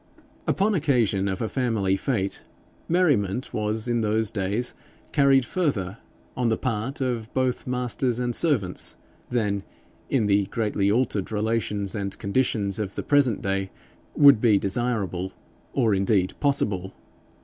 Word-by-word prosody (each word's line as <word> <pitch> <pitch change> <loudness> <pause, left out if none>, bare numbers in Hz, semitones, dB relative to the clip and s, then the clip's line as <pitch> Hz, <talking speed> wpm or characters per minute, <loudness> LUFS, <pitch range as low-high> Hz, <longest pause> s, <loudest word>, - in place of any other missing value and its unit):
Upon 205 +3 +2
occasion 120 - +1
of 95 +3 -2
a - - 0
family 110 -7 0
fete, 100 -2 -2 0.5
merriment 130 - +1
was 110 +1 -1
in 120 -1 +1
those 110 0 +1
days 105 +4 -1 0.4
carried 135 -3 +4
further, 115 - -1 0.4
on 125 -2 +1
the 110 - +1
part 130 +4 -3
of 120 -3 -2
both 130 -1 0
masters 125 -1 -1
and 120 -1 -1
servants, 115 - +1 0.3
than 105 -5 0 0.5
in 125 -6 +2
the 100 -1 +2
greatly 105 -3 0
altered 110 -4 0
relations 105 -2 -1
and 100 -2 -4
conditions 105 -2 0
of 100 -2 -3
the - - -3
present 140 -7 +3
day 95 0 -1 0.5
would 140 -6 +7
be 110 -4 +5
desirable, 100 -3 -1 0.4
or, 115 -6 +2
indeed, 95 -1 +1
possible. 105 -10 0
110 Hz, 135 wpm, -25 LUFS, 100-125 Hz, 0.5 s, would